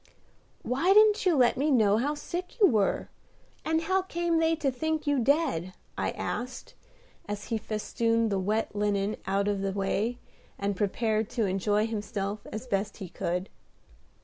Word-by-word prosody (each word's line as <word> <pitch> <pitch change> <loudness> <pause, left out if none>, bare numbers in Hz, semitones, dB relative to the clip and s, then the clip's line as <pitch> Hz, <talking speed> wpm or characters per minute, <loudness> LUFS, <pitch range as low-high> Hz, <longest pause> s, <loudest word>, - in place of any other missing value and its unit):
"Why 335 +10 +2
didn't 425 -2 +5
you 350 - +4
let 250 -3 +4
me 290 +4 +1
know 215 -6 +4
how 285 +6 0
sick 360 +8 -6
you 415 - +7
were? 215 - +2 0.5
And 320 0 +1
how 375 +3 +1
came 345 -2 0
they 325 0 +3
to 300 -4 0
think 315 +4 -2
you 290 -2 +2
dead?" 245 - +1 0.2
I - - -1
asked, 255 +1 -5 0.5
as 205 0 -5
he 225 - +1
festooned 225 +1 0
the 195 - +1
wet 210 +3 -1
linen 205 0 0
out 200 +1 +1
of 200 -1 0
the 195 -1 -1
way, 205 +4 -1 0.4
and 200 0 -1
prepared 215 +2 0
to 235 -3 0
enjoy 205 +3 +1
himself 205 -2 -4
as 220 +3 -5
best 200 -3 -2
he 190 - -7
could. 180 +4 -2
225 Hz, 165 wpm, -28 LUFS, 200-300 Hz, 0.5 s, you